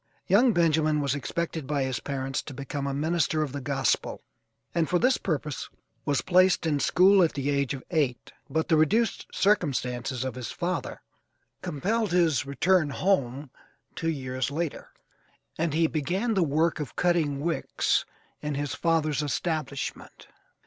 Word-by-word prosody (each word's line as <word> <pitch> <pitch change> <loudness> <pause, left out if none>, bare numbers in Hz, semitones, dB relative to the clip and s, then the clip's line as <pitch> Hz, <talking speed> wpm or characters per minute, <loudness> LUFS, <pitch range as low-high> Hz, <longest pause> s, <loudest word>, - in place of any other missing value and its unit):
Young 220 +7 +5
Benjamin 155 -4 +2
was 140 -3 0
expected 160 +1 -3
by 145 -2 0
his 130 -1 -2
parents 135 -1 -3
to 140 - -9
become 140 +1 -4
a - - -1
minister 155 0 +1
of 145 - -4
the 140 +1 -5
Gospel, 135 -2 -1 0.5
and 165 -3 +1
for 180 - +3
this 255 +8 +3
purpose 150 -5 -3 0.4
was 145 -2 +1
placed 185 -1 +4
in 150 -3 +1
school 190 +6 +5
at 170 - +3
the 140 0 -1
age 140 -1 0
of 130 - -9
eight, 145 -7 0 0.2
but 160 +3 0
the 160 - +4
reduced 215 +9 +2
circumstances 130 - 0
of 130 - -3
his 125 -2 -6
father 175 -6 -3 0.6
compelled 205 +7 -1
his 160 -7 +2
return 160 +3 +2
home 140 -5 0 0.4
two 165 - -2
years 130 -4 -2
later, 160 +1 -4 0.7
and 160 -2 -1
he 165 +1 +3
began 180 +9 -1
the 195 - +2
work 160 +1 +1
of 150 - -5
cutting 165 -6 +1
wicks 165 +3 0 0.4
in 150 -1 -3
his 145 0 -2
father's 155 -4 +1
establishment. 150 -2 -4
155 Hz, 155 wpm, -27 LUFS, 140-170 Hz, 0.7 s, Young